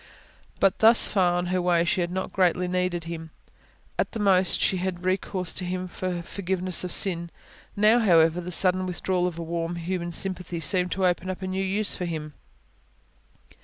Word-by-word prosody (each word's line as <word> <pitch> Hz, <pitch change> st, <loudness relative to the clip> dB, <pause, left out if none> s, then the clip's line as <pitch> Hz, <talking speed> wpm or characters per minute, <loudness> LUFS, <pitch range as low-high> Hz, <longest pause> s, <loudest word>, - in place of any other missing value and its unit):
But 195 Hz, -1 st, +2 dB
thus 225 Hz, +1 st, +6 dB
far 185 Hz, -3 st, +2 dB
on 175 Hz, -, -1 dB
her 185 Hz, -, +1 dB
way 175 Hz, -1 st, +2 dB
she 175 Hz, +2 st, 0 dB
had 175 Hz, -, -1 dB
not 185 Hz, +1 st, -4 dB
greatly 180 Hz, -1 st, +1 dB
needed 180 Hz, -1 st, -1 dB
Him: 165 Hz, -1 st, -7 dB, 0.7 s
at -, -, -1 dB
the 225 Hz, -, -4 dB
most, 190 Hz, -3 st, +3 dB
she 190 Hz, -, +1 dB
had 185 Hz, 0 st, -2 dB
had 175 Hz, +1 st, -12 dB
recourse 185 Hz, -1 st, -1 dB
to 185 Hz, -, -3 dB
Him 185 Hz, +1 st, -3 dB
for 180 Hz, -1 st, -4 dB
forgiveness 185 Hz, 0 st, -1 dB
of 180 Hz, -, -4 dB
sin. 170 Hz, -3 st, +2 dB, 0.5 s
Now, 215 Hz, +3 st, +4 dB
however, 170 Hz, -5 st, +3 dB
the 180 Hz, +1 st, -7 dB
sudden 185 Hz, +1 st, +3 dB
withdrawal 180 Hz, 0 st, -1 dB
of 175 Hz, -2 st, -6 dB
a 170 Hz, -, -4 dB
warm, 170 Hz, +1 st, -3 dB
human 175 Hz, 0 st, -4 dB
sympathy 180 Hz, -1 st, -2 dB
seemed 180 Hz, +4 st, +1 dB
to 190 Hz, 0 st, 0 dB
open 180 Hz, +1 st, 0 dB
up 185 Hz, 0 st, -5 dB
a -, -, -3 dB
new 190 Hz, +1 st, -2 dB
use 200 Hz, +2 st, -1 dB
for 180 Hz, -, -4 dB
Him. 155 Hz, -3 st, -5 dB
180 Hz, 195 wpm, -25 LUFS, 175-190 Hz, 0.7 s, thus